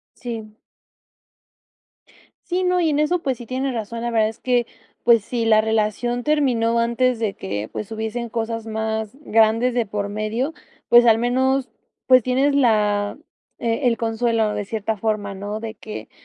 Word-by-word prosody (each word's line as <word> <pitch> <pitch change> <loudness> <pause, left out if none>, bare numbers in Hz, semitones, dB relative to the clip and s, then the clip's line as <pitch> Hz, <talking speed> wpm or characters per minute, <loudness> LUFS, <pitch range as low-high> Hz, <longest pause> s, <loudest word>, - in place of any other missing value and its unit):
Sí. 225 -3 -7 1.9
Sí, 365 +1 0
no, 360 0 +2
y 330 -3 +2
en 290 - +1
eso, 330 +3 +1
pues 265 -4 -1
sí, 240 - -9
tienes 260 +2 -2
razón. 230 0 -4
La 240 0 -2
verdad 220 -2 +2
es 220 - -10
que, 245 -2 +1 0.4
pues 230 -3 +5
sí, 235 -2 -2
la 215 -1 +5
relación 220 +3 0
terminó 245 -6 +2
antes 235 +2 +1
de 220 -3 -1
que, 100 +2 -4
pues, 215 - -5
hubiesen 225 +2 -4
cosas 225 0 -3
más 220 -1 -2
grandes 225 0 +3
de 235 -3 0
por 205 0 -3
medio. 220 +8 -2 0.3
Pues 240 0 +7
al 225 -1 +6
menos, 260 +2 +1 0.4
pues, 255 -1 +6
tienes 265 +4 +1
la 210 -6 +2 0.4
e 235 +3 0
el 230 - +2
consuelo 225 -1 0
de 205 - -2
cierta 220 +1 -2
forma, 205 -1 -2
¿no?, 205 +2 -5
de 225 -1 -6
que 215 - -8
230 Hz, 165 wpm, -22 LUFS, 215-250 Hz, 1.9 s, Pues